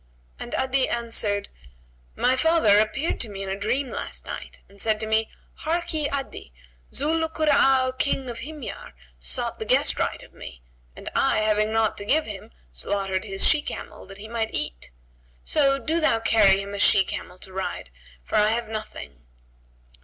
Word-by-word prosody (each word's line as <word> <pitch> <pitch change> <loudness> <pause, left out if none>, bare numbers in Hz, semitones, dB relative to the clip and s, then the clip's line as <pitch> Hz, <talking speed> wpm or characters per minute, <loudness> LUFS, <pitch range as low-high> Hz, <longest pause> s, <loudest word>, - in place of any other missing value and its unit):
and - - -5
Adi 265 0 +1
answered, 225 -4 -1 0.7
"My 255 - +3
father 285 -9 +5
appeared 270 +9 0
to 230 - -1
me 195 -1 -6
in 195 - -5
a 190 - -1
dream 240 +7 -1
last - - -6
night - - -7
and 200 0 -9
said 220 -1 +2
to - - -1
me, 220 0 +1 0.3
'Harkye, 320 -2 -1
Adi; 275 - -5 0.4
Zu 300 +3 0
'l 320 - 0
Kura'a 270 -5 +3
King 270 -2 +1
of 235 -1 -5
Himyar, 295 0 -7 0.3
sought - - -3
the - - -4
guest - - +2
rite - - -1
of - - -16
me - - -11 0.3
and - - -11
I, 215 - +3
having 215 0 +2
naught 225 -1 +1
to 205 - -5
give 310 +8 +2
him, 205 -3 -8 0.2
slaughtered 195 - -2
his 195 -2 0
she 300 - +5
camel, - - -7
that 195 - -11
he 210 +2 -9
might 225 -1 -2
eat: - - -3 0.5
so 275 - +3
do 320 +4 0
thou 270 -8 +3
carry 210 -4 +5
him 200 0 -7
a 200 - -4
she 195 -1 +6
camel 180 - -6
to 190 0 -9
ride, 190 - -4 0.3
for - - -1
I 210 - +5
have 225 +1 0
nothing.'" 215 - -7
220 Hz, 180 wpm, -25 LUFS, 200-275 Hz, 0.7 s, she